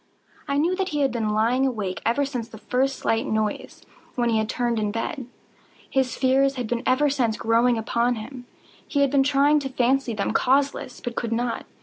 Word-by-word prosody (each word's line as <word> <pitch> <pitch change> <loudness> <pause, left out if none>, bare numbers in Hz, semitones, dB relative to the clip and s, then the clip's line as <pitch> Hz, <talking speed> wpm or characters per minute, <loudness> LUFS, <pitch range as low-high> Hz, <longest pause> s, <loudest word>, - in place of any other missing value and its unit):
I 280 -1 0
knew 335 +5 +2
that 385 -1 -1
he 295 -3 -1
had 270 -2 +2
been 225 -3 -1
lying 235 +5 +2
awake 205 -7 -3
ever 280 +5 +2
since 245 -4 -5
the 220 - -11
first 260 +4 -1
slight 225 +1 0
noise, 215 -1 -3 0.3
when 240 -1 +1
he 220 -1 +2
had 215 0 -2
turned 240 -2 0
in 210 - 0
the - - -2
bed. 240 +3 -4 0.6
His 265 -1 0
fears 270 +1 +3
had 250 -2 -3
been 235 +1 -2
ever 270 +3 +3
since 245 -6 0
growing 230 +2 +2
upon 235 +2 0
him. 245 +3 -9 0.4
He 285 - 0
had 280 -2 +3
been 280 -1 +4
trying 285 +2 +3
to 275 -2 -4
fancy 255 -1 +1
them 200 - -1
causeless, 270 -1 +1
but 240 -1 -5
could 230 -1 -3
not. 235 +1 -2
250 Hz, 210 wpm, -24 LUFS, 230-275 Hz, 0.6 s, been